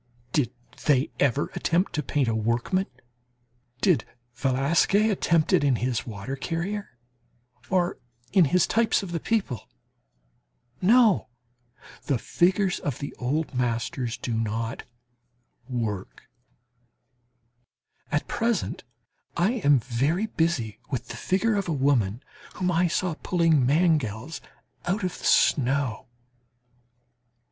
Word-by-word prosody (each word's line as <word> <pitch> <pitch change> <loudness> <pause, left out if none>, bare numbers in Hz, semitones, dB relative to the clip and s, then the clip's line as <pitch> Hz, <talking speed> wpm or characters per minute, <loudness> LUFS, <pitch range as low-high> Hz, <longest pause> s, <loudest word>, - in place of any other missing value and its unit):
Did 140 -6 +1 0.4
they 140 -1 +3
ever 140 +1 +1
attempt 175 +4 0
to 150 - 0
paint 145 -3 0
a 115 - +1
workman? 115 - 0 0.9
Did 165 - +3 0.3
Velasquez 150 - +2
attempt 170 -5 +2
it - - +4
in 140 -3 +3
his 120 -1 -2
"Water 110 +4 -5
Carrier" 170 +1 -4 0.7
or 180 -2 +1 0.3
in 185 -4 +6
his 175 +4 +3
types 225 -2 +2
of 185 - -6
the 170 - -2
people? 190 - -2 1.1
No! 220 +1 +5 0.8
The 140 - +1
figures 185 - +1
of 140 -5 -3
the 140 - -6
old 145 +5 -1
masters 120 0 -1
do 120 0 -4
not 115 +2 -2 0.8
"work." 110 -6 -4 1.9
At - - 0
present 230 -3 -1 0.5
I 175 +6 +3
am 145 -1 +6
very 135 - 0
busy 160 - -1
with 130 -5 -4
the - - -6
figure 195 - +1
of 200 -2 -1
a - - +1
woman 130 -5 +1 0.3
whom 180 -1 0
I 175 +1 +3
saw 175 +1 0
pulling 165 -7 +3
mangels 150 - +1 0.5
out 195 +4 0
of 180 - -3
the - - -8
snow. 135 -3 +2
145 Hz, 120 wpm, -26 LUFS, 120-180 Hz, 1.9 s, in